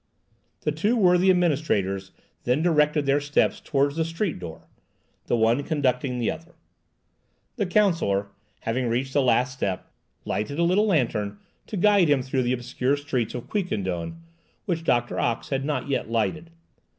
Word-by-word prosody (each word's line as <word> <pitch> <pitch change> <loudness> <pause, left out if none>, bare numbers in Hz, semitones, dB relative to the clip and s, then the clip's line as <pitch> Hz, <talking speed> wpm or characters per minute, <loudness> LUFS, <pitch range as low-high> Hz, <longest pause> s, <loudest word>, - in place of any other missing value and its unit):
The 150 - 0
two 200 +10 +1
worthy 180 -2 +4
administrators 135 - +1 0.3
then 125 +6 +1
directed 150 -3 +3
their 140 +1 +2
steps 145 +1 +1
towards 140 +1 0
the 165 - +2
street 165 - -2
door, 80 -2 -9 0.6
the - - +2
one 115 +4 +3
conducting 130 -4 0
the 120 - 0
other. 165 +2 -10 1.0
The 205 -5 0
counsellor, 165 - +2 0.3
having 120 +2 -1
reached 130 +3 -1
the 145 - +3
last 125 0 +2
step, 100 -8 -3 0.3
lighted 105 +9 -2
a 170 - +2
little 190 +5 +3
lantern 115 - 0 0.3
to 210 - -4
guide 200 -3 +4
him 140 -3 +3
through 130 0 -1
the 125 0 +1
obscure 125 +2 -1
streets 130 -6 -2
of 120 - -6
Quiquendone, 105 - -2 0.5
which 170 -5 -2
Doctor 120 -6 +1
Ox 120 0 -1
had 135 -1 -1
not 145 -3 -2
yet 135 -4 -1
lighted. 115 - -1
140 Hz, 155 wpm, -25 LUFS, 120-165 Hz, 1.0 s, worthy